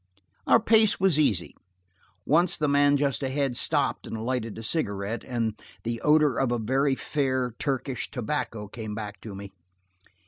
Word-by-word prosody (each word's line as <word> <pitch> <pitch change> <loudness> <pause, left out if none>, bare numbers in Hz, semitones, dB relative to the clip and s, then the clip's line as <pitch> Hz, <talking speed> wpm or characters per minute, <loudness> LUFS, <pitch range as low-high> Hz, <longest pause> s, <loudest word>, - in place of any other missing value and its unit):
Our - - +6
pace 220 -1 +4
was 185 -5 +3
easy. 100 - +1 0.7
Once 170 +4 +3
the 150 - 0
man 145 0 +4
just 140 -4 0
ahead 135 -1 -1
stopped - - 0
and 110 0 -5
lighted 120 -4 -2
a 115 - -7
cigarette, 105 -5 -2
and 115 -4 -3 0.2
the 115 0 -3
odor 150 -3 +4
of 135 -2 +1
a 120 - +1
very 135 +5 +1
fair 130 -4 -1
Turkish 130 -3 -2
tobacco 115 -4 -3
came 110 0 -6
back 105 -2 -6
to 105 -3 -8
me. 100 0 -8
130 Hz, 160 wpm, -26 LUFS, 110-145 Hz, 0.7 s, Our